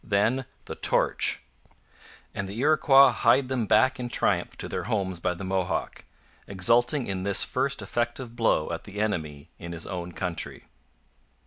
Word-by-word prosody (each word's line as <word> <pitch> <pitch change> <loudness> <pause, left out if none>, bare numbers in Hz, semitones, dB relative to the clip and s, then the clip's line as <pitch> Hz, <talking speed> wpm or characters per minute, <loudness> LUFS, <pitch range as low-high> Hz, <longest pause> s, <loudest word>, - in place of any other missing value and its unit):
Then 115 +5 0 0.2
the - - -6
torch! - - +1 0.9
And 100 -1 -5
the 100 - -7
Iroquois 140 -2 +5
hied 120 +3 +2
them 125 -5 -1
back 130 +4 +3
in 120 -1 -4
triumph - - 0
to - - -4
their - - -4
homes 95 -6 -2
by 90 +1 -1
the 85 - -8
Mohawk, 95 -2 -3 0.4
exulting 120 - +2
in 95 -1 -4
this 100 +1 +4
first - - -1
effective 120 0 -3
blow 115 -10 +1
at 85 - -6
the 105 0 -8
enemy 80 -9 -3
in 85 0 -7
his 85 - -4
own 90 -2 -6
country. 90 -2 -4
105 Hz, 155 wpm, -26 LUFS, 90-120 Hz, 0.9 s, Iroquois